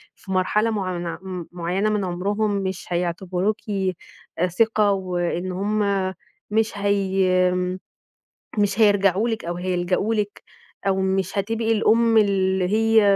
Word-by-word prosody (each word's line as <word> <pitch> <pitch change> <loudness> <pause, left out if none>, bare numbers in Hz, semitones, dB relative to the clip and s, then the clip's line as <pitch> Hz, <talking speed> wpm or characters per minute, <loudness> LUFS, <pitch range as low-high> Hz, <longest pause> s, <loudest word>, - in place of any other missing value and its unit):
في 190 - -11
مرحلة 210 +4 +2
معن 185 -5 -3
م 185 -3 -6
معيّنة 180 +4 -1
من 210 -2 0
عمرهم 205 +4 -1
مش 190 -2 -3
هيعتبروكِ 180 +3 -1 0.9
ثقة 210 +2 +2
وإن 180 -1 -2
هم 200 0 0 0.4
مش 220 0 +1
هي 190 -2 +2 1.1
مش 205 +1 +1
هيرجعوا 200 +1 +4
لِك 225 -1 -3
أو 175 +1 -3
هيلجأوا 180 +4 0
لِك 205 -1 -3 0.4
أو 190 -1 +2
مش 190 +1 0
هتبقي 225 +3 0
الأم 225 +1 +3
اللي 190 -2 +2
هي 225 +1 +4
195 Hz, 120 wpm, -23 LUFS, 185-210 Hz, 1.1 s, هيرجعوا